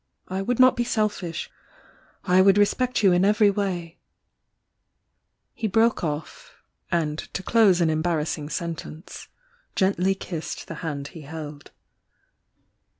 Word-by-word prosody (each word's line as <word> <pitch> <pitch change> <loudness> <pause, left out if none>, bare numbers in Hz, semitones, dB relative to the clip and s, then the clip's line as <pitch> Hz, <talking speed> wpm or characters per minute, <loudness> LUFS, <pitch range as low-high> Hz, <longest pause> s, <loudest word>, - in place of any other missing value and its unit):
I 190 +1 -2
would 245 +5 -1
not 255 0 +7
be 240 - 0
selfish, 205 -8 -2 0.4
— - - -28 0.3
I 180 +1 +4
would 195 +1 +5
respect 245 +4 +2
you 195 - +6
in 175 +1 +3
every 210 +1 +4
way 180 -4 -3 0.7
" - - -53 0.7
He 220 - -2
broke 225 +2 +2
off 155 -1 -5 0.2
— - - -52
and 155 -2 0
to 195 - -6
close 200 -6 +4
an 165 -2 +3
embarrassing 155 -2 -1
sen 170 +2 -2
tence 160 +3 -10 0.5
gently 190 0 +2
kissed 170 -4 -6
the - - -6
hand 145 -3 -4
he 165 - -11
held. 150 -1 -8
180 Hz, 145 wpm, -24 LUFS, 160-205 Hz, 0.7 s, not